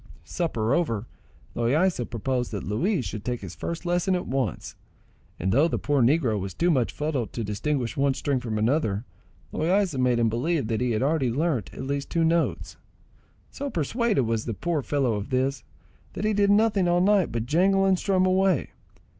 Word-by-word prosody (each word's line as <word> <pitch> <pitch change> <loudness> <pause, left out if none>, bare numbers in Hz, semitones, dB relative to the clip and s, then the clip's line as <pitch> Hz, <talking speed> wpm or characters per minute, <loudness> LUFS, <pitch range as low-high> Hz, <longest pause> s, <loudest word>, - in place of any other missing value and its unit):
Supper 120 - -1
over, 120 -11 0 0.5
Loaysa 135 +3 +1
proposed 125 +2 -2
that 100 - -3
Luis 140 - 0
should 100 +2 -5
take 125 -1 -3
his 95 -3 -7
first 170 - -5
lesson 175 +2 +1
at 180 - -2
once; 130 -8 -3 0.6
and 95 +3 0
though 140 - +4
the - - -1
poor 145 -2 +1
negro 120 -4 +2
was 95 -1 -5
too 175 +1 +2
much 130 -7 +1
fuddled 145 -6 -2
to 115 - -3
distinguish 120 +3 -2
one 140 -1 +1
string 140 -1 -1
from 115 -4 -3
another, 110 -2 0 0.5
Loaysa 180 -2 +1
made 125 -1 +2
him 115 -1 +2
believe 125 +3 -1
that 115 0 -1
he 125 - +1
had 110 - 0
already 140 -3 +1
learnt 135 - -1
at - - -7
least 140 0 -3
two 165 - +1
notes. 165 +1 0 0.7
So 285 0 -4
persuaded 220 - 0
was 115 -1 -1
the 115 - -3
poor 170 - -1
fellow 135 -1 0
of 105 -1 -4
this, 130 -1 0 0.5
that 210 - -3
he 215 - +2
did 200 0 +2
nothing 205 -3 +3
all 175 0 +3
night 195 - +3
but 115 0 -2
jangle 195 +7 +3
and 190 -2 +3
strum 185 -2 +2
away. 185 -4 +2
140 Hz, 190 wpm, -25 LUFS, 115-175 Hz, 0.7 s, though